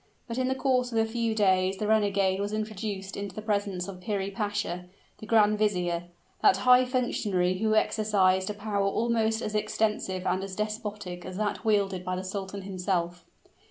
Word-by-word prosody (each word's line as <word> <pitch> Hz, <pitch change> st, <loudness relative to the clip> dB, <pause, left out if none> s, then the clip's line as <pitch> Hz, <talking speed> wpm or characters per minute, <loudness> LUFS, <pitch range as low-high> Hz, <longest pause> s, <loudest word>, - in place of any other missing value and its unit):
But 235 Hz, +1 st, -3 dB
in 255 Hz, -, +1 dB
the 260 Hz, -, 0 dB
course 255 Hz, -2 st, +1 dB
of 225 Hz, -, -1 dB
a 225 Hz, -, +4 dB
few 225 Hz, 0 st, -1 dB
days 190 Hz, -2 st, +3 dB
the 210 Hz, -, -2 dB
renegade 200 Hz, -3 st, +2 dB
was 205 Hz, +1 st, -2 dB
introduced 210 Hz, -2 st, -4 dB
into 200 Hz, -2 st, -5 dB
the 215 Hz, -, -5 dB
presence 200 Hz, -4 st, -1 dB
of 185 Hz, -2 st, -8 dB
Piri 200 Hz, -1 st, -2 dB
Pasha, 205 Hz, -4 st, -2 dB, 0.3 s
the 215 Hz, -, -9 dB
grand 210 Hz, -2 st, +4 dB
vizier 175 Hz, -5 st, 0 dB, 0.4 s
that 190 Hz, -, +5 dB
high 250 Hz, 0 st, +7 dB
functionary 205 Hz, -8 st, 0 dB
who 215 Hz, 0 st, +2 dB
exercised 195 Hz, -4 st, +2 dB
a 210 Hz, -, -3 dB
power 205 Hz, -1 st, -1 dB
almost 225 Hz, +1 st, +1 dB
as 215 Hz, -, -3 dB
extensive 210 Hz, -3 st, -1 dB
and 185 Hz, +1 st, 0 dB
as 195 Hz, -1 st, -6 dB
despotic 210 Hz, -4 st, -4 dB
as 185 Hz, 0 st, -7 dB
that 210 Hz, 0 st, -2 dB
wielded 200 Hz, -4 st, +1 dB
by 185 Hz, 0 st, -2 dB
the 185 Hz, -, -4 dB
sultan 195 Hz, +1 st, -5 dB
himself. 180 Hz, -2 st, -2 dB
205 Hz, 180 wpm, -28 LUFS, 190-220 Hz, 0.4 s, high